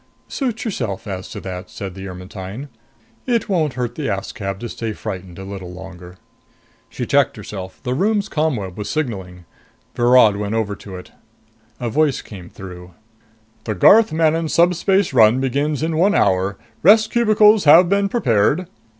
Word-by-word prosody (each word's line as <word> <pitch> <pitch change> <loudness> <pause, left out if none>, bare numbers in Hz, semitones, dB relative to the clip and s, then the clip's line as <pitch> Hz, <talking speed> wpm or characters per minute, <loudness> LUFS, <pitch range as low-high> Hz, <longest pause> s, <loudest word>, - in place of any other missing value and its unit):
"Suit 245 -4 -3
yourself 120 - -4
as 95 -3 -6
to - - -7
that," 90 0 -7
said 95 -2 -7
the 95 +1 -8
Ermetyne. 95 +7 -8 0.6
"It 235 -2 0
won't 160 -8 0
hurt 120 -2 -3
the 150 +2 -4
Askab 100 -1 -4
to 120 - -4
stay 110 -1 -4
frightened 95 -5 -7
a 95 - -8
little 95 -2 -7
longer." 90 -1 -11 0.7
She - - -5
checked - - +2
herself. 95 -2 -8
The 125 -1 -2
room's 205 +7 0
ComWeb 125 - -2
was 105 0 -5
signaling. 95 - -4 0.5
Virod 120 -4 +4
went 105 +1 -3
over 105 -2 -1
to 95 -1 -10
it. 90 - -11 0.7
A 120 -2 -3
voice 150 +1 +1
came 90 -4 -11
through. 90 -2 -11 0.3
"... 110 0 -36
The 110 - -2
Garth 215 - +6
Manon 160 0 +1
subspace 180 +2 +2
run 115 0 +5
begins 140 +3 -1
in 160 0 -1
one 195 +6 +3
hour. 95 +1 +1 0.2
Rest 215 +5 +5
cubicles 215 -4 +4
have 165 +5 +7
been 200 +1 +1
prepared...." 140 - +1
115 Hz, 160 wpm, -19 LUFS, -, 0.7 s, have